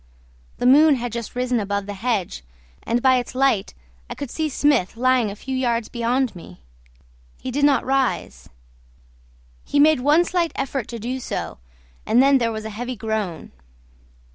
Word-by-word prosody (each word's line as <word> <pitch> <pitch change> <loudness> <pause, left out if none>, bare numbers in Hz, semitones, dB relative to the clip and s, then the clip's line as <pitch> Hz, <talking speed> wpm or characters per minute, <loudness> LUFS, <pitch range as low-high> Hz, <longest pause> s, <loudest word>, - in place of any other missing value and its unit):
The - - -3
moon 290 +4 +6
had 245 -1 -4
just 235 +1 -6
risen 250 -1 0
above 200 -1 -2
the 205 - -6
hedge, 200 - -2 0.4
and 240 +1 -1
by 260 -1 +5
its 245 0 -4
light 260 -7 +1 0.3
I - - -6
could 280 - -6
see 315 -1 -2
Smith 275 -8 +1
lying 255 -2 +2
a 200 - -7
few 265 +5 -5
yards 235 -3 -1
beyond 240 0 -1
me. 90 - -13 0.8
He 260 - -5
did 285 +3 +2
not 275 -4 +3
rise; 265 -1 -1 1.1
he 285 - 0
made 305 -1 +5
one 300 +7 +3
slight 345 -2 -1
effort 270 -3 -3
to 235 - -6
do 245 +4 -4
so, 240 - -5 0.4
and 230 - +2
then 275 +1 +5
there 230 -1 0
was 220 -1 -6
a 220 - -5
heavy 245 +4 -5
groan. 220 -7 -4
245 Hz, 170 wpm, -22 LUFS, 220-270 Hz, 1.1 s, moon